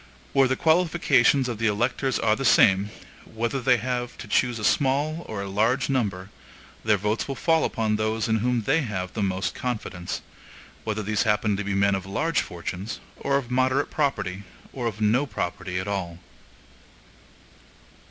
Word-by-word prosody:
Where 135 -1 +5
the 130 - +1
qualifications 160 -6 +3
of 120 -3 -4
the 115 - +2
electors 120 +5 0
are 110 -1 +2
the 135 - -4
same, 100 -5 +5 0.3
whether 120 +4 -3
they 125 0 +4
have 125 +1 -3
to 115 - -9
choose 120 +3 +1
a 105 - -6
small 145 +7 +1
or 100 -2 -4
a - - -5
large 115 +8 +1
number, 100 -7 -1 0.5
their 105 -1 +3
votes 105 +3 -1
will 135 - -3
fall 160 +1 +2
upon 110 -1 0
those 110 0 0
in 110 0 +2
whom 120 +1 0
they 150 +8 +2
have 95 -8 -4
most 95 -3 -1
confidence; 105 -8 -4 0.6
whether 110 -1 -2
these 105 0 0
happen 105 -2 +2
to 100 - -3
be 100 0 -2
men 100 0 +3
of 95 -1 -3
large 150 +10 0
fortunes, 90 +4 -6 0.2
or 140 0 0
of 125 -3 -5
moderate 130 +2 +1
property, 135 -10 -1 0.3
or 125 -3 -2
of 110 -1 -5
no 120 +7 +2
property 90 -4 -4
at 95 - -5
all. 95 -4 -3
110 Hz, 170 wpm, -25 LUFS, 100-130 Hz, 0.6 s, Where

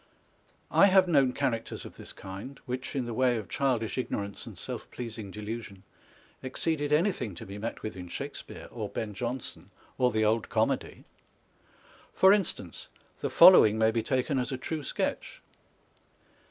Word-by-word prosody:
I 200 - +7
have 190 -1 +5
known 140 -6 +4
characters 125 -4 -2
of - - -10
this - - -6
kind, 100 +8 -9
which, 130 +3 -4
in 130 -3 -1
the 120 - -4
way 125 0 +2
of 110 - -5
childish 130 -4 0
ignorance 100 -5 -4
and - - -10
self - - -6
pleasing 115 -4 -7
delusion, 105 -1 -7 0.6
exceeded 145 +3 -1
anything 150 - +1
to - - -8
be 100 +2 -8
met 115 +3 -5
with 110 - -4
in 90 -1 -8
Shakespear - - -7
or - - -5
Ben 105 -2 -4
Jonson, 115 -6 -5 0.3
or 125 -1 +4
the 110 -2 +1
old 110 +1 +1
comedy. - - -1 1.1
For 190 +1 +7
instance, 205 -4 -2 0.3
the - - -2
following 110 0 +8
may 110 0 +4
be 115 0 0
taken 130 +3 0
as 125 - -2
a 130 - -2
time 155 +3 -4
sketch. - - -3
120 Hz, 160 wpm, -29 LUFS, 110-135 Hz, 1.1 s, following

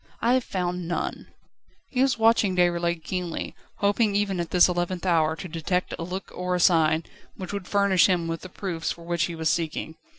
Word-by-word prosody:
I 235 +2 +2
have 255 -1 +2
found 180 -3 -3
none." 170 - -3 0.6
He 255 - +1
was 265 -2 +3
watching 225 -4 +3
Déroulède 170 -2 +1
keenly, 180 0 -4 0.3
hoping 205 +1 +2
even 200 -2 0
at 170 - -2
this 180 -1 +6
eleventh 175 0 -2
hour 160 -3 +2
to 185 +2 -7
detect 175 +2 -2
a - - -3
look 185 +3 -6
or 180 0 -2
a - - 0
sign, 160 -2 +4 0.3
which 185 0 -7
would 200 -3 -5
furnish 200 -2 +4
him 175 -3 +1
with 165 0 -3
the 185 - -9
proofs 180 -4 -3
for 170 - -8
which 170 0 0
he 170 - -5
was 160 -1 +1
seeking. 160 -1 -2
180 Hz, 200 wpm, -25 LUFS, 170-195 Hz, 0.6 s, this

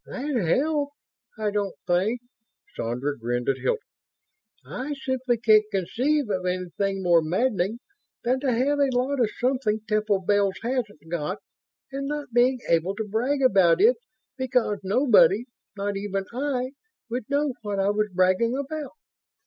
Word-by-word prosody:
"That 285 +3 -4
helps 285 - +1 0.4
I 215 -1 -1
don't 200 -2 -2
think." 195 +7 +1 0.5
Sandra 125 +5 -2
grinned 120 0 -3
at 135 -1 +1
Hilton. 460 -2 -1 0.8
"I 285 +3 -4
simply 260 -3 -1
can't 215 -2 +5
conceive 255 - 0
of 185 -2 -1
anything 185 +2 -2
more 170 -2 +5
maddening 195 +4 0 0.5
than 255 +2 +1
to 265 -1 0
have 270 +5 +1
a 280 -1 +3
lot 260 +3 0
of 235 -4 +3
something 245 -4 0
Temple 210 -2 +1
Bells 200 0 +2
hasn't 220 - -3
got 170 +3 -2 0.5
and 275 +1 -3
not 295 -4 -4
being 245 +1 +3
able 170 +4 +1
to 220 0 -4
brag 255 +7 0
about 185 -8 +5
it 230 +5 +5 0.4
because 250 -5 +1
nobody 215 +1 +4 0.3
not 200 0 -2
even 195 -1 -3
I 260 -1 -1 0.4
would 240 -1 -4
know 285 -1 +1
what 205 -2 -3
I 195 +1 +2
was 210 0 0
bragging 185 +7 +2
about!" 285 0 -5
220 Hz, 150 wpm, -25 LUFS, 195-260 Hz, 0.8 s, can't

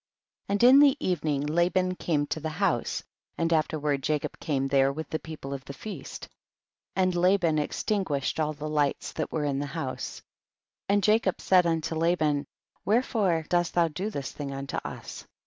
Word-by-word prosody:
2. 200 - -1
And 205 - +1
in 260 +3 +9
the 290 -1 +6
evening 150 -5 0
Laban 175 +4 +2
came 155 -5 0
to 160 - -3
the 160 +1 -3
house, 155 - 0 0.3
and 165 0 +1
afterward 150 -3 0
Jacob 150 +1 -2
came 135 -3 -1
there 135 0 +3
with 155 +3 -5
the 155 - -1
people 155 -4 -7
of 135 -1 -6
the 140 - -7
feast, 215 - -7 0.7
and 185 -1 +2
Laban 175 -3 +3
extinguished 150 -2 -1
all 155 -1 0
the 150 +1 -6
lights 150 -2 0
that 155 - -4
were 160 - -1
there 145 - 0
in 135 - -1
the 145 - -2
house. 140 -3 -5 0.6
3. 200 - +2
And 205 - +2
Jacob 210 -3 +2
said 180 -2 +4
unto 165 -1 -1
Laban, 160 -3 +1 0.4
wherefore 205 -7 +1
dost 175 -1 +1
thou 170 -2 +4
do 185 +7 -3
this 140 -10 -5
thing 140 -2 -6
unto 135 0 -4
us - - -7
160 Hz, 180 wpm, -27 LUFS, 145-185 Hz, 0.7 s, in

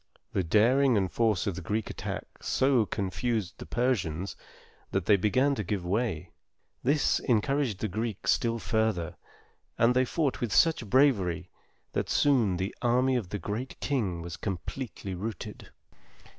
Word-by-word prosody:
The 95 - +1
daring 120 +8 +4
and 95 -2 0
force 110 -5 +1
of 100 - 0
the 95 - -6
Greek 105 +5 -2
attack - - -4 0.2
so 130 -5 +2
confused 100 -2 -2
the - - -8
Persians, 100 -8 -1 0.5
that 95 -3 -1
they 105 - +6
began 130 +9 +2
to 110 - -2
give 95 -1 -3
way. 90 -4 -1 0.5
This 145 +2 +2
encouraged 125 -1 +1
the 110 - 0
Greeks 110 +1 -1
still 115 -1 +1
further, 110 -7 0 0.6
and 115 +2 +4
they 130 0 +4
fought 145 +1 -1
with 120 -4 -1
such 155 - +3
bravery 95 - +2 0.4
that - - -1
soon 120 -11 +3
the 95 +3 -2
army 125 +2 +3
of 110 -8 -2
The 105 - -3
Great 105 +8 -5
King 100 - -1
was 85 -1 -6
completely 100 +2 -5
routed. 100 +1 -6
110 Hz, 150 wpm, -29 LUFS, 95-125 Hz, 0.6 s, they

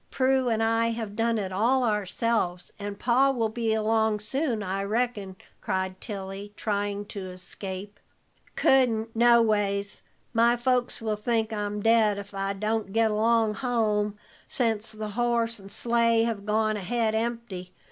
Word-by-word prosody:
Prue 260 -1 +2
and 225 -1 +1
I 225 +1 +2
have 225 -3 -4
done 230 +1 +1
it 195 -3 -3
all 240 +7 +2
ourselves, 210 -4 -1
and 205 0 -5
Pa 255 +4 +3
will 235 -5 0
be 225 0 -1
along 220 0 +1
soon, 230 +1 -1
I 195 0 -2
reckon," 210 -3 -2 0.3
cried 190 0 -2
Tilly, 200 0 -6
trying 205 -1 -2
to 195 -2 -7
escape. 190 +2 -7 0.6
"Couldn't, 230 -4 +2
no 235 0 +6
ways. 200 -2 0 0.3
My 235 +1 +4
folks 245 -1 0
will 215 -1 -1
think 225 0 0
I'm 210 -1 -3
dead 225 -2 +4
ef 200 0 -8
I 195 0 -2
don't 215 0 -2
get 225 -1 +3
along 220 0 +2
home, 210 -4 0 0.3
sence 225 -3 -1
the 215 -1 -5
horse 235 0 0
and 195 0 -11
sleigh 230 +1 +2
have 220 -3 -3
gone 215 0 +1
ahead 220 +3 0
empty. 220 -5 -3
220 Hz, 150 wpm, -27 LUFS, 205-230 Hz, 0.6 s, no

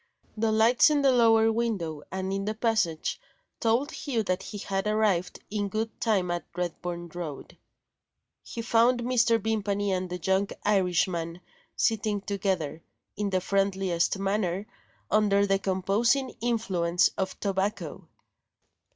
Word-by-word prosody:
The 220 0 +1
lights 225 +7 +5
in 295 -2 +2
the 270 - +5
lower 225 -2 +5
window, 200 -10 -2
and 190 0 -3
in 195 0 -2
the 215 +1 -2
passage, 220 - 0 0.4
told 235 +7 +1
Hugh 245 -7 -2
that 185 -1 -1
he 210 - -7
had 195 0 -2
arrived 210 -4 +1
in 205 -1 -1
good 220 +2 -4
time 195 -6 +1
at 175 -1 -2
Redburn 175 0 -4
Road. 160 -4 -7 0.9
He 230 - -6
found 240 +2 +3
Mr. 235 -2 +3
Vimpany 205 -2 -1
and 185 -1 -1
the 180 - -3
young 190 +3 +1 0.2
Irishman 180 -4 +1 0.4
sitting 215 -2 +1
together, 190 -7 -2 0.3
in 205 -1 -1
the 185 -1 0
friendliest 195 -2 +1
manner, 195 -1 -1 0.5
under 200 -1 +4
the 195 -1 +2
composing 210 +8 +1
influence 190 -8 +1
of 190 -1 -4
tobacco. 195 -3 -2
200 Hz, 135 wpm, -27 LUFS, 185-225 Hz, 0.9 s, lights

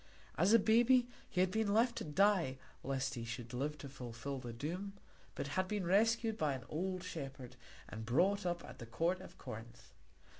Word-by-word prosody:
As 180 +7 +3
a 230 - +9
baby 240 +4 +5 0.2
he 180 - +1
had 185 0 +3
been 210 0 +1
left 235 +2 +4
to - - -2
die 170 -4 +3 0.3
lest 135 0 -1
he 120 - -4
should 115 +1 -6
live 145 +4 -2
to 140 - -8
fulfil 130 0 -6
the 120 -2 -6
doom, 170 +11 -4 0.4
but 140 - -3
had 185 +5 0
been 205 -2 -1
rescued 225 +4 +3
by 150 -3 +1
an 130 - -7
old 185 +3 -2
shepherd 135 -5 -6 0.3
and 110 +1 -6
brought 180 - +2
up 175 -1 -2
at - - -11
the 115 - -8
court 170 +9 0
of 190 - -12
Corinth. 115 +2 -9
165 Hz, 190 wpm, -36 LUFS, 130-200 Hz, 0.4 s, a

